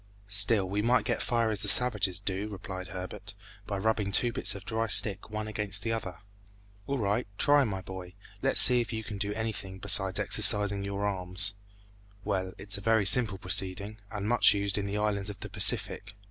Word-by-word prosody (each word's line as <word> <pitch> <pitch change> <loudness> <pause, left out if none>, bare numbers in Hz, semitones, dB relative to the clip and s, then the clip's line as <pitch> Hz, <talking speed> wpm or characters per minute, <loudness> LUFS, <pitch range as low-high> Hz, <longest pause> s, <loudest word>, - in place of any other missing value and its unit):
"Still 100 0 +1
we 100 +2 -3
might 120 +3 +1
get 120 -2 -2
fire 115 -2 -1
as 105 -2 -2
the - - -3
savages 105 -7 +2
do," 100 +1 -4
replied 95 -2 -9
Herbert, 95 +1 -9 0.3
"by 100 - -4
rubbing 105 -1 -2
two 120 +4 0
bits - - +2
of 100 -1 -11
dry 115 +1 -3
stick 105 -1 +3
one 110 0 -6
against 105 -1 -2
the 115 - -2
other." 95 -6 -6 0.7
"All 140 - -3
right; 105 +1 -2
try, 145 0 +3
my 95 -4 -5
boy, 95 -1 -9
and 90 - -17 0.3
let's - - +1
see 125 -1 +6
if 120 - -7
you 110 -1 -5
can 105 -1 -8
do 100 0 -3
anything 110 -4 -6
besides 95 -1 +4
exercising 100 -1 +3
your 100 +1 -5
arms." 95 +1 +2 0.7
"Well, 95 -2 -4
it's 100 +1 -3
a - - -13
very 110 -1 +1
simple 110 -3 +5
proceeding, 95 +3 0
and 105 -1 -6
much 120 -2 +4
used 100 0 -2
in 100 - -4
the 100 +1 -4
islands 105 -1 -2
of 100 - -10
the - - -7
Pacific." - - +1
100 Hz, 200 wpm, -27 LUFS, 95-110 Hz, 0.7 s, see